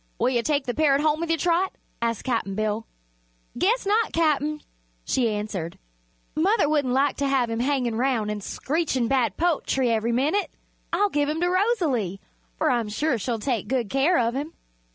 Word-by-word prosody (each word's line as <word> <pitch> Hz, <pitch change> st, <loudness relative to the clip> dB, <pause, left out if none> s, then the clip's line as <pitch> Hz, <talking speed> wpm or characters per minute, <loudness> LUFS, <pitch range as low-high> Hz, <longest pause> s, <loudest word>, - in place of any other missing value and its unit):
"Will -, -, +2 dB
you 245 Hz, -2 st, +1 dB
take 285 Hz, +1 st, 0 dB
the 245 Hz, -, -2 dB
parrot 285 Hz, -2 st, +3 dB
home 305 Hz, 0 st, +2 dB
with 335 Hz, 0 st, -3 dB
you, 330 Hz, -, +2 dB
Trot?" 350 Hz, +4 st, +1 dB, 0.3 s
asked 230 Hz, -2 st, -1 dB
Cap'n 230 Hz, -6 st, -1 dB
Bill. 215 Hz, +1 st, -2 dB, 0.7 s
"Guess 410 Hz, -, +1 dB
not, 430 Hz, +3 st, +2 dB
Cap'n," 305 Hz, -2 st, +1 dB, 0.4 s
she 245 Hz, -3 st, +1 dB
answered. 205 Hz, -5 st, -4 dB, 0.6 s
"Mother 375 Hz, +3 st, +3 dB
wouldn't 285 Hz, -4 st, +1 dB
like 280 Hz, +1 st, +2 dB
to 280 Hz, -, 0 dB
have 260 Hz, -4 st, +1 dB
him 225 Hz, -, -2 dB
hangin' 255 Hz, -2 st, 0 dB
'round 235 Hz, -3 st, 0 dB
an' 210 Hz, -1 st, -4 dB
screechin' 270 Hz, -, -1 dB
bad 235 Hz, -6 st, +1 dB
po'try 300 Hz, -6 st, +1 dB
ev'ry 230 Hz, 0 st, +1 dB
minute. 295 Hz, +12 st, +1 dB, 0.4 s
I'll 410 Hz, 0 st, +2 dB
give 290 Hz, 0 st, +1 dB
him 310 Hz, +1 st, -1 dB
to 355 Hz, -, +2 dB
Rosalie, 335 Hz, -, +1 dB, 0.4 s
for -, -, +2 dB
I'm 235 Hz, -3 st, 0 dB
sure 250 Hz, +3 st, 0 dB
she'll 235 Hz, +2 st, -2 dB
take 230 Hz, 0 st, -2 dB
good 245 Hz, -6 st, -1 dB
care 285 Hz, +7 st, +3 dB
of 235 Hz, -1 st, +1 dB
him." 290 Hz, +5 st, -4 dB
270 Hz, 180 wpm, -25 LUFS, 230-315 Hz, 0.7 s, parrot